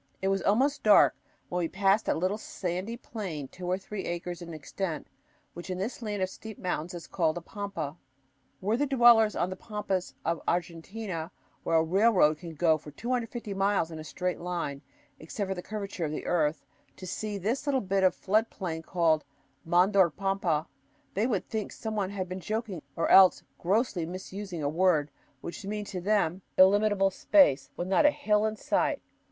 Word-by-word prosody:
It 190 Hz, -, 0 dB
was 195 Hz, -1 st, +1 dB
almost 265 Hz, +10 st, +2 dB
dark 210 Hz, -2 st, +6 dB, 0.3 s
when 180 Hz, -, -1 dB
we 170 Hz, -, 0 dB
passed 195 Hz, +4 st, +2 dB
a -, -, +2 dB
little 185 Hz, +6 st, -1 dB
sandy 190 Hz, +4 st, -4 dB
plain 185 Hz, -, -6 dB
two 180 Hz, +6 st, -8 dB
or 180 Hz, +1 st, +1 dB
three 195 Hz, +1 st, -6 dB
acres 175 Hz, +1 st, -4 dB
in 170 Hz, -1 st, -8 dB
extent, 160 Hz, +2 st, -4 dB, 0.5 s
which 175 Hz, +2 st, -9 dB
in 185 Hz, -, -2 dB
this 210 Hz, +7 st, -4 dB
land 205 Hz, -4 st, -2 dB
of 185 Hz, -, -1 dB
steep 220 Hz, -2 st, -9 dB
mountains 180 Hz, -1 st, -3 dB
is 170 Hz, -, -7 dB
called 165 Hz, -3 st, 0 dB
a -, -, -4 dB
pampa. 185 Hz, -6 st, -5 dB, 0.6 s
Were 205 Hz, +4 st, +1 dB
the 290 Hz, +4 st, +1 dB
dwellers 235 Hz, -5 st, +6 dB
on 180 Hz, -, 0 dB
the -, -, -3 dB
pampas 195 Hz, -3 st, -3 dB
of 165 Hz, 0 st, 0 dB
Argentina 170 Hz, +1 st, -3 dB, 0.3 s
where 165 Hz, -, 0 dB
a 160 Hz, -, +5 dB
railroad 180 Hz, -3 st, +4 dB
can 165 Hz, -3 st, -8 dB
go 160 Hz, 0 st, +3 dB
for 150 Hz, -, -11 dB
250 235 Hz, -, -3 dB
miles 195 Hz, -3 st, +1 dB
in 160 Hz, -, -7 dB
a -, -, -6 dB
straight 180 Hz, +3 st, -3 dB
line, 170 Hz, -6 st, -3 dB, 0.4 s
except 190 Hz, +5 st, -4 dB
for 190 Hz, -, -1 dB
the 180 Hz, -, -6 dB
curvature 200 Hz, -4 st, -4 dB
of 150 Hz, -, -3 dB
the 155 Hz, -, -5 dB
earth 160 Hz, -3 st, 0 dB, 0.3 s
to 185 Hz, -, -9 dB
see 210 Hz, +3 st, -4 dB
this 230 Hz, +10 st, -2 dB
little 275 Hz, -2 st, +2 dB
bit 195 Hz, -3 st, 0 dB
of 185 Hz, -, +4 dB
flood 215 Hz, +4 st, +1 dB
plain 165 Hz, -5 st, -4 dB
called 165 Hz, -2 st, +1 dB, 0.4 s
Mandor 180 Hz, +2 st, +4 dB
Pampa, 185 Hz, -3 st, -1 dB, 0.5 s
they 210 Hz, +5 st, +1 dB
would 210 Hz, -7 st, -1 dB
think 220 Hz, -2 st, -3 dB
some 220 Hz, -1 st, -5 dB
one 200 Hz, -3 st, 0 dB
had 190 Hz, -2 st, -4 dB
been 185 Hz, +1 st, -5 dB
joking 210 Hz, -2 st, -3 dB
or 165 Hz, -, 0 dB
else 190 Hz, -1 st, +7 dB, 0.2 s
grossly 190 Hz, -3 st, 0 dB
misusing 185 Hz, -1 st, -6 dB
a -, -, +1 dB
word 155 Hz, -2 st, +2 dB, 0.3 s
which 170 Hz, -, -7 dB
means 210 Hz, +1 st, -4 dB
to 185 Hz, -3 st, -4 dB
them 195 Hz, -2 st, +1 dB, 0.2 s
illimitable 195 Hz, +1 st, +5 dB
space 185 Hz, -, +4 dB
with 175 Hz, -, -3 dB
not 195 Hz, +9 st, +5 dB
a -, -, +8 dB
hill 215 Hz, -8 st, +1 dB
in 215 Hz, -, -3 dB
sight. -, -, 0 dB
190 Hz, 190 wpm, -29 LUFS, 170-210 Hz, 0.6 s, a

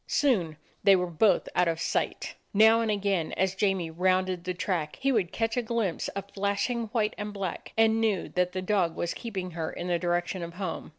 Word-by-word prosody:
Soon 185 Hz, -, +1 dB, 0.3 s
they 195 Hz, -1 st, +7 dB
were 180 Hz, -1 st, +1 dB
both 180 Hz, +3 st, +2 dB
out 180 Hz, 0 st, +3 dB
of 165 Hz, -1 st, 0 dB
sight. -, -, -2 dB, 0.2 s
Now 220 Hz, +2 st, +6 dB
and 225 Hz, -, 0 dB
again, 200 Hz, -5 st, 0 dB
as 190 Hz, 0 st, +1 dB
Jamie 190 Hz, -4 st, 0 dB
rounded 185 Hz, +1 st, +1 dB
the 180 Hz, -, -1 dB
track, 170 Hz, -4 st, -2 dB
he 275 Hz, 0 st, +2 dB
would 205 Hz, -8 st, +1 dB
catch 225 Hz, 0 st, -1 dB
a 245 Hz, -, +1 dB
glimpse 225 Hz, -6 st, -1 dB
of 200 Hz, 0 st, -6 dB
flashing 205 Hz, +4 st, -1 dB
white 215 Hz, -1 st, 0 dB
and 210 Hz, 0 st, -4 dB
black, 195 Hz, -3 st, -5 dB
and 225 Hz, 0 st, +4 dB
knew 215 Hz, -5 st, +1 dB
that 180 Hz, 0 st, 0 dB
the 185 Hz, 0 st, -3 dB
dog 185 Hz, -4 st, +1 dB
was 170 Hz, -, -2 dB
keeping 190 Hz, -6 st, -5 dB
her 160 Hz, -1 st, -3 dB
in 175 Hz, -, -5 dB
the 175 Hz, -1 st, +1 dB
direction 175 Hz, +1 st, -1 dB
of 170 Hz, 0 st, -6 dB
home. 185 Hz, -3 st, -4 dB
190 Hz, 210 wpm, -28 LUFS, 175-215 Hz, 0.3 s, they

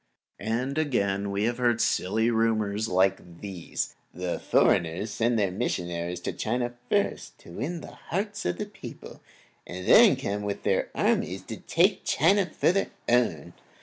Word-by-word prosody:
And 125 Hz, +7 st, -1 dB
again, 100 Hz, -9 st, 0 dB
we 100 Hz, +1 st, -1 dB
have 120 Hz, +2 st, 0 dB
heard 120 Hz, -2 st, +2 dB
silly 110 Hz, +5 st, +1 dB
rumors 110 Hz, -2 st, +1 dB
like 95 Hz, -3 st, 0 dB
these: 95 Hz, -5 st, -4 dB, 0.2 s
The 90 Hz, 0 st, -3 dB
foreigners 85 Hz, +6 st, +2 dB
send 115 Hz, +2 st, +1 dB
their 100 Hz, -3 st, +1 dB
missionaries 85 Hz, -1 st, -2 dB
to -, -, -3 dB
China 120 Hz, +2 st, -1 dB
to 120 Hz, -, -20 dB
first 205 Hz, -1 st, 0 dB
win 140 Hz, -, -5 dB
the -, -, -10 dB, 0.2 s
hearts 205 Hz, +4 st, -2 dB
of 90 Hz, 0 st, -1 dB
the -, -, -3 dB
people, -, -, -11 dB, 0.5 s
and 90 Hz, +1 st, -7 dB
then -, -, +8 dB
come 105 Hz, +1 st, -3 dB
with 100 Hz, -1 st, -4 dB, 0.3 s
armies -, -, 0 dB
to -, -, -7 dB
take -, -, +2 dB
China 190 Hz, +6 st, +3 dB
for 155 Hz, -, +2 dB
their 195 Hz, +2 st, 0 dB, 0.2 s
own. 120 Hz, 0 st, +1 dB
110 Hz, 150 wpm, -27 LUFS, 95-120 Hz, 0.5 s, then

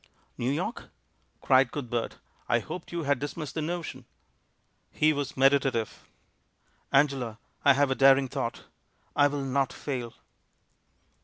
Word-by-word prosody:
"New 120 Hz, -, -2 dB
York?" 175 Hz, -, -3 dB, 0.6 s
cried 130 Hz, -2 st, +4 dB
Cuthbert. 120 Hz, -5 st, -3 dB, 0.3 s
"I 120 Hz, -, +4 dB
hoped 150 Hz, +10 st, -7 dB
you 170 Hz, -1 st, -3 dB
had 140 Hz, -2 st, +1 dB
dismissed 145 Hz, +1 st, -5 dB
the 160 Hz, -, -2 dB
notion." 155 Hz, -6 st, -4 dB, 0.8 s
He 155 Hz, 0 st, +2 dB
was 145 Hz, -2 st, -4 dB
meditative. 135 Hz, -4 st, +2 dB, 0.8 s
"Angela, 135 Hz, -5 st, +2 dB, 0.3 s
I 140 Hz, -, +7 dB
have 140 Hz, 0 st, +2 dB
a -, -, +4 dB
daring 135 Hz, 0 st, +5 dB
thought! 130 Hz, -2 st, -4 dB, 0.5 s
I 145 Hz, -, +5 dB
will 145 Hz, -1 st, -3 dB
not 135 Hz, 0 st, 0 dB
fail." 125 Hz, -5 st, -5 dB
135 Hz, 130 wpm, -28 LUFS, 130-145 Hz, 0.8 s, I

